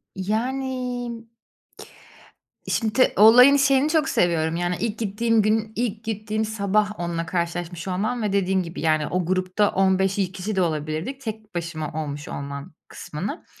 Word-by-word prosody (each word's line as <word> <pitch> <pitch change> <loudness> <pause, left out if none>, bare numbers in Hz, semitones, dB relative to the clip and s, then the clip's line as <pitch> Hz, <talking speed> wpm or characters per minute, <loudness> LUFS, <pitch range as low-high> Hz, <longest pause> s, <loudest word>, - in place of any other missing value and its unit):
Yani 245 +3 -3 1.4
Şimdi 225 +3 +2
olayın 250 +7 +8
şeyini 275 +1 +3
çok 310 -3 +2
seviyorum, 165 -2 +1
yani, 175 +1 -1
ilk 225 -1 -2
gittiğim 225 +1 +1
gün, 215 +1 +1
ilk 225 -2 -2
gittiğim 215 0 -2
sabah 210 -1 0
onunla 170 -1 -2
karşılaşmış 170 +1 -3
olmam 215 +7 -1
ve 210 -2 -1
dediğim 190 -1 +1
gibi, 165 0 -7
yani, 155 -2 +2
o 180 -1 -1
grupta 185 +3 +1
15 190 0 +2
kişi 195 +1 -2
de 190 - +2
olabilirdik, 160 - -2
tek 220 -4 -7
başıma 165 -3 -4
olmuş 145 0 -6
olmam 140 +1 -6
kısmını. 190 - -6
200 Hz, 135 wpm, -23 LUFS, 175-225 Hz, 1.4 s, olayın